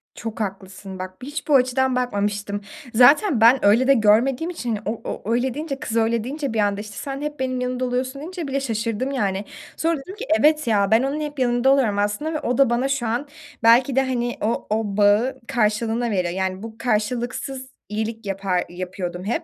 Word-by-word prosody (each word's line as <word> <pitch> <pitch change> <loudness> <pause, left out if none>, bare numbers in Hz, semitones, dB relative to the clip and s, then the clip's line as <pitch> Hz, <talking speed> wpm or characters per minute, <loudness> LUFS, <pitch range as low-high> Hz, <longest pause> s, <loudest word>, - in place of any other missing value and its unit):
Çok 225 -1 -6
haklısın 190 -1 -6
bak. 185 0 -6
Hiç 290 +3 -6
bu 290 - +4
açıdan 255 0 +2
bakmamıştım. 205 -4 -1 0.3
Zaten 255 - +5
ben 240 +2 +6
öyle 230 +6 +5
de 275 - +7
görmediğim 245 +8 +3
için, 250 -9 -5
hani, - - -4
o 215 +2 -3
o 220 - -5
öyle 245 +1 0
deyince, 290 -1 -4
kız 235 -6 -3
öyle 225 0 +1
deyince, 280 0 -4
bir 220 - -1
anda, 205 0 +1
işte, 210 -1 -10
"Sen 275 0 -5
hep 295 0 -5
benim 255 -1 -1
yanımda 250 0 -1
oluyorsun" 255 +2 -2
deyince 345 -1 -6
bile 275 +1 -1
şaşırdım, 230 +1 -2
yani. 200 -6 -1 0.3
Sonra 330 -1 +1
dedim 370 +8 -10
ki, 420 - -6
"Evet 305 -2 +3
ya, 200 -2 +2
ben 225 +3 +5
onun 285 +3 -2
hep 295 -1 -5
yanında 245 +1 +2
oluyorum 235 -7 +2
aslında 210 +11 -1
ve 305 - -1
o 245 -3 -1
da 275 -3 +5
bana 245 +3 +1
şu 275 -4 -1
an 240 +6 -2 0.4
belki 245 +3 +5
de, 270 - +5
hani, 245 -2 -2
o 225 +2 -1
o 210 -2 -1
bağı 210 +6 +3
karşılığında 225 +1 0
veriyor." 180 -3 0
Yani, 190 +1 -2
bu 225 -1 -8
karşılıksız 245 +3 -2 0.2
iyilik 220 +1 -4
yapar 195 -2 -1
yapıyordum 180 0 -5
hep. 215 - -2
240 Hz, 200 wpm, -22 LUFS, 210-270 Hz, 0.4 s, de